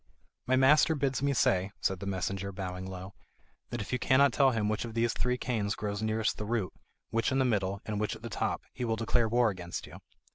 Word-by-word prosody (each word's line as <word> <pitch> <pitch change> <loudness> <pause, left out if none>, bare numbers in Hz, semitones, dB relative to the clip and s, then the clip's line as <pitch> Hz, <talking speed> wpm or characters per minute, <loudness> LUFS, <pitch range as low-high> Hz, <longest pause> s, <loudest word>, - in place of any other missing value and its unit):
"My 130 - +4
master 150 +4 +5
bids 135 -2 0
me 140 0 +2
say," 95 -6 +2
said 95 -1 0
the 100 - -6
messenger, 95 +1 -2
bowing 95 -1 -5
low, 95 +1 -7 0.6
"that 120 - -3
if 105 - -6
you 125 - +1
cannot 140 +1 +4
tell 135 -2 +5
him 110 -4 0
which 110 +2 -1
of 115 -1 -7
these 115 0 +2
three 125 0 0
canes 110 -5 -1
grows 105 0 -3
nearest 110 0 0
the 105 - -3
root, 110 -5 -1 0.4
which 115 +3 +1
in 135 - +1
the 130 - +3
middle, 100 -4 0
and 105 -2 -2
which 105 +1 -1
at 110 - -14
the - - -4
top, - - -2
he - - -5
will 115 -2 +1
declare 115 0 +1
war 120 -1 +3
against 90 -2 -6
you. - - -11
110 Hz, 230 wpm, -30 LUFS, 100-125 Hz, 0.6 s, master